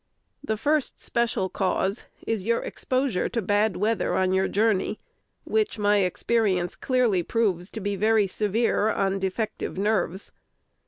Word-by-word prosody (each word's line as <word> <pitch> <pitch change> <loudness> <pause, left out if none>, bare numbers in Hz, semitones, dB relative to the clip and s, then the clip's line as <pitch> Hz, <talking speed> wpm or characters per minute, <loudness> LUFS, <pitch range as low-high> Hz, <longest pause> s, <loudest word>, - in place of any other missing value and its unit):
The 220 -6 -1
first 295 +4 0
special 235 -5 0
cause 190 +2 -1 0.2
is 220 -4 -1
your 230 +3 0
exposure 255 -7 -1
to 240 - -2
bad 205 -1 +1
weather 215 +3 0
on 185 0 +2
your 190 0 +2
journey, 215 0 +1 0.5
which 430 - 0
my 205 0 +3
experience 190 -1 +1
clearly 245 -8 +1
proves 190 -2 0
to 225 - -6
be 205 0 -2
very 215 +1 +3
severe 215 +2 +1
on 195 -2 0
defective 190 +1 -3
nerves. 195 -2 -1
210 Hz, 140 wpm, -25 LUFS, 190-230 Hz, 0.5 s, my